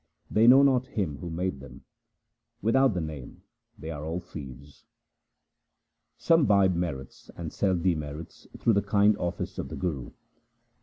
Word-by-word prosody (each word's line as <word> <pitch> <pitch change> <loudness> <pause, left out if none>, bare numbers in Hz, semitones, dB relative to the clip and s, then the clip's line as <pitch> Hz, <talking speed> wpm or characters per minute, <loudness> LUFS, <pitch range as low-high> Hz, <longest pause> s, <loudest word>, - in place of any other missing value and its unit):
They 110 +2 +4
know 135 +3 +8
not 130 -2 +3
Him 80 -9 -1
who 90 - -6
made 85 -2 -3
them; 65 -3 -13 0.8
without 125 +1 +3
the 90 - -1
Name 75 -5 -8 0.3
they 80 +3 -7
are 75 -2 -6
all 80 +3 -3
thieves. 70 -3 -11 1.3
Some 165 -3 +3
buy 100 -2 +5
merits 85 -7 -4
and 80 -2 -6
sell 95 -2 +1
demerits 80 -3 -3
through 115 - +2
the 100 - +3
kind 100 +1 +3
office 85 0 -4
of - - -4
the - - -6
Guru. 75 -9 -3
90 Hz, 150 wpm, -27 LUFS, 75-105 Hz, 1.3 s, know